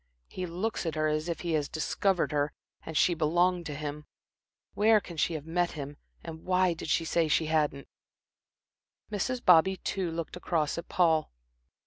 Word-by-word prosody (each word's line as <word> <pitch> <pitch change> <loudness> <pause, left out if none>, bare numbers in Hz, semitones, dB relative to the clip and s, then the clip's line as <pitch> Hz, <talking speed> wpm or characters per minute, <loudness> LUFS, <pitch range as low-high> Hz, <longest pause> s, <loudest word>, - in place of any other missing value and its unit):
"He 185 -1 -5
looks 185 +2 -2
at 160 - -2
her 155 0 +1
as 155 +2 -1
if 170 - -3
he 170 - -2
had 150 -3 0
discovered 170 0 0
her 145 -1 0 0.3
and 160 -1 -4
she 180 - +4
belonged 175 +2 +1
to 150 - -5
him. 150 0 -6 0.7
Where 215 +1 +5
can 175 -4 -10
she 165 +1 0
have 150 -1 -6
met 175 +1 0
him, 145 -1 -6 0.3
and 160 -1 -8
why 185 -1 +2
did 165 - -7
she 165 - +2
say 165 0 +1
she 160 +1 +2
hadn't." 150 -3 0 1.2
Mrs. 245 +5 -2
Bobby, 185 +1 +6
too, 190 -2 -2
looked 165 0 -5
across 165 -3 -1
at 170 - -9
Paul. 165 -3 +2
165 Hz, 175 wpm, -29 LUFS, 155-180 Hz, 1.2 s, Bobby